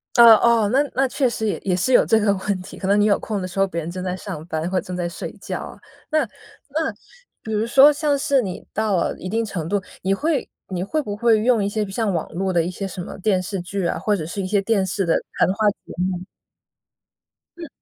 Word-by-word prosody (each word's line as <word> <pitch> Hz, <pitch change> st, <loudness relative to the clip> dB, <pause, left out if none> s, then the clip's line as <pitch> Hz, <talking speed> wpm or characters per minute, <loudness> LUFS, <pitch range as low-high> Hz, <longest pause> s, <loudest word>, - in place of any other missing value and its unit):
呃， 235 Hz, -2 st, +10 dB
哦。 230 Hz, -3 st, +3 dB
那 270 Hz, +3 st, +4 dB
那 270 Hz, +2 st, +3 dB
确 260 Hz, 0 st, +1 dB
实 225 Hz, -1 st, -3 dB
也 205 Hz, -, -1 dB
也 185 Hz, -2 st, +1 dB
是 185 Hz, +8 st, +1 dB
有 -, -, +6 dB
这 225 Hz, -, +4 dB
个 205 Hz, -2 st, +3 dB
问 190 Hz, -1 st, -2 dB
题， -, -, -11 dB
可 190 Hz, -, -4 dB
能 200 Hz, +1 st, +4 dB
你 205 Hz, -, +4 dB
有 205 Hz, -, +3 dB
空 210 Hz, -3 st, -3 dB
的 185 Hz, -, -3 dB
时 185 Hz, +2 st, -6 dB
候 195 Hz, -, +4 dB
别 170 Hz, -2 st, -3 dB
人 160 Hz, -, -5 dB
正 185 Hz, +1 st, -5 dB
在 180 Hz, -1 st, -2 dB
上 155 Hz, -4 st, -7 dB
班 160 Hz, 0 st, -2 dB
或 185 Hz, 0 st, +1 dB
正 180 Hz, -, -6 dB
在 175 Hz, -1 st, -2 dB
睡 170 Hz, -, -6 dB
觉 -, -, -4 dB
啊。 -, -, -9 dB, 0.3 s
那 310 Hz, -, +2 dB, 0.5 s
那 315 Hz, +3 st, -1 dB, 0.5 s
比 220 Hz, -, -6 dB
如 215 Hz, +1 st, +1 dB
说 275 Hz, +4 st, +7 dB
像 290 Hz, -1 st, +1 dB
是 275 Hz, -1 st, +2 dB
你 190 Hz, -6 st, -6 dB
到 215 Hz, -2 st, +1 dB
了 170 Hz, -, 0 dB
一 185 Hz, -, -6 dB
定 225 Hz, +3 st, 0 dB
程 170 Hz, -7 st, -4 dB
度， 200 Hz, 0 st, +1 dB, 0.2 s
你 190 Hz, +1 st, +1 dB
会 295 Hz, +6 st, -1 dB, 0.2 s
你 180 Hz, -2 st, -2 dB
会 310 Hz, +11 st, -1 dB
不 205 Hz, -7 st, -5 dB
会 225 Hz, 0 st, +3 dB
用 230 Hz, -1 st, +3 dB
一 200 Hz, -, 0 dB
些 210 Hz, 0 st, -1 dB
像 205 Hz, +1 st, -1 dB
网 165 Hz, -, -2 dB
络 190 Hz, +2 st, -1 dB
的 170 Hz, -2 st, +2 dB
一 175 Hz, -, -3 dB
些 195 Hz, +2 st, -4 dB
什 185 Hz, -, -6 dB
么 175 Hz, -, -8 dB
电 190 Hz, -2 st, +1 dB
视 185 Hz, 0 st, -4 dB
剧 190 Hz, +1 st, -3 dB
啊， -, -, 0 dB
或 205 Hz, +3 st, +1 dB
者 165 Hz, -6 st, -4 dB
是 185 Hz, +5 st, -4 dB
一 185 Hz, -, -3 dB
些 200 Hz, 0 st, +2 dB
电 200 Hz, -2 st, +1 dB
视 195 Hz, 0 st, -1 dB
的 165 Hz, -, +2 dB, 0.2 s
谈 -, -, +4 dB
话 210 Hz, +1 st, +3 dB
节 205 Hz, -, -9 dB
目？ 185 Hz, 0 st, -2 dB, 1.3 s
嗯。 335 Hz, -2 st, -7 dB
200 Hz, 275 characters per minute, -22 LUFS, 185-225 Hz, 1.3 s, 呃